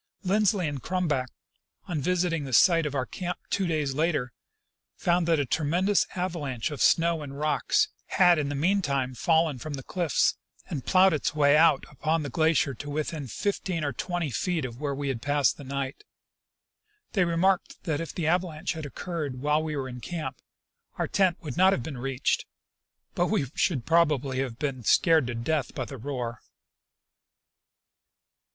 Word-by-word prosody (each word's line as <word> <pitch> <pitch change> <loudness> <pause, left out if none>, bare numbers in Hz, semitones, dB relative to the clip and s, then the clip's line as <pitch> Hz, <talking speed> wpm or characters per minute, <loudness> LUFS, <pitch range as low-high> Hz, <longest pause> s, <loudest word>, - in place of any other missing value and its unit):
Lindsley 195 -2 +2
and 145 -3 -4
Crumback, 155 -6 -1 0.6
on 175 -5 -2
revisiting 175 0 0
the 135 -2 -6
site 165 +5 +5
of 145 - -5
our 130 -2 0
camp 180 +6 -4
two 195 -2 +1
clays 150 -4 0
later, 150 -5 0 0.6
found 175 -1 +1
that 165 -2 +3
a 145 - +1
tremendous 175 +9 +1
avalanche 160 -10 -2
of 145 - -5
snow 165 -1 +3
and 140 -1 -7
rocks 285 - +2 0.2
had 175 -3 +4
in 145 -2 -1
the 145 - -3
mean 185 +8 +2
time 135 -5 -1
fallen 160 0 +2
from 155 +2 -5
the 135 - -8
cliffs 170 -2 +1 0.3
and 135 -5 -5
ploughed 190 -1 +5
its 155 0 -1
way 145 -1 +5
out 155 -2 +4
upon 155 +3 -1
the 145 - -5
glacier 160 -1 +2
to 145 +4 -8
within 150 -1 -3
fifteen 180 - -2
or 145 -2 -1
twenty 175 -5 -3
feet 160 - -1
of 120 +2 -8
where 140 -2 -1
we 140 0 -3
had 125 -4 -3
passed 145 0 +2
the 145 - -9
night. 140 - -4 1.1
They 195 - +2
remarked 175 +2 +1
that 160 -4 -1
if 165 - -5
the 170 - -3
avalanche 170 -1 0
had 160 -3 -6
occurred 145 -4 -5
while 150 +2 +2
we 155 -1 -3
were 135 -2 -3
in 125 -1 -7
camp, 145 -6 -5 0.6
our - - -1
tent 190 -3 +2
would 145 -6 -6
not 190 +2 +6
have 125 - -2
been 135 -3 -6
reached, 135 +1 -1 0.7
but 175 - +1
that - - -4
we 175 -10 +1
should 140 -10 0
probably 150 -6 +2
have 130 -4 -3
been 135 -4 -3
scared 160 - +4
to 120 - -3
death 130 +2 -1
by 130 - -2
the 135 - -8
roar. 120 -3 -4
150 Hz, 180 wpm, -27 LUFS, 135-170 Hz, 1.1 s, not